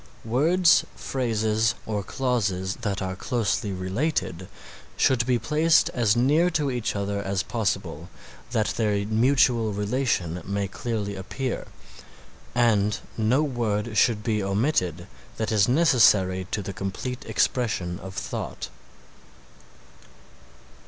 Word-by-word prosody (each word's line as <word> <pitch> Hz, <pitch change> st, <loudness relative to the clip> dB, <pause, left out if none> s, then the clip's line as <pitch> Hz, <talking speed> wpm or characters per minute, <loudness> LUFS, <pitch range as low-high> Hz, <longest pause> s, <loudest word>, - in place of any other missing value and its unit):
Words, 165 Hz, +9 st, +4 dB
phrases 115 Hz, -2 st, 0 dB
or 105 Hz, -2 st, -2 dB
clauses 100 Hz, -5 st, -1 dB
that 100 Hz, -4 st, -3 dB
are 95 Hz, 0 st, -3 dB
closely 110 Hz, -1 st, -1 dB
related 95 Hz, -, -2 dB, 0.5 s
should 120 Hz, -3 st, +2 dB
be 125 Hz, -1 st, +3 dB
placed 155 Hz, +5 st, +3 dB
as 115 Hz, -3 st, +2 dB
near 150 Hz, +9 st, +3 dB
to 150 Hz, -5 st, 0 dB
each 120 Hz, -4 st, -2 dB
other 100 Hz, 0 st, -2 dB
as 95 Hz, -1 st, -1 dB
possible 95 Hz, -7 st, -3 dB, 0.4 s
that 110 Hz, -3 st, 0 dB
their 105 Hz, -3 st, 0 dB
mutual 115 Hz, 0 st, +3 dB
relation 105 Hz, -5 st, -1 dB
may 100 Hz, +1 st, -2 dB
clearly 105 Hz, 0 st, -4 dB
appear, 125 Hz, +7 st, -4 dB, 0.9 s
and 105 Hz, -4 st, +3 dB, 0.2 s
no 120 Hz, +7 st, +2 dB
word 115 Hz, -5 st, -2 dB
should 105 Hz, 0 st, +3 dB
be 110 Hz, -1 st, 0 dB
omitted 95 Hz, -, 0 dB, 0.3 s
that 110 Hz, 0 st, -2 dB
is 105 Hz, -2 st, +3 dB
necessary 105 Hz, -, +4 dB
to 105 Hz, -, -2 dB
the 100 Hz, -, -5 dB
complete 100 Hz, +7 st, -5 dB
expression 100 Hz, -8 st, 0 dB
of 95 Hz, 0 st, -9 dB
thought. -, -, -5 dB
110 Hz, 115 wpm, -25 LUFS, 100-125 Hz, 0.9 s, Words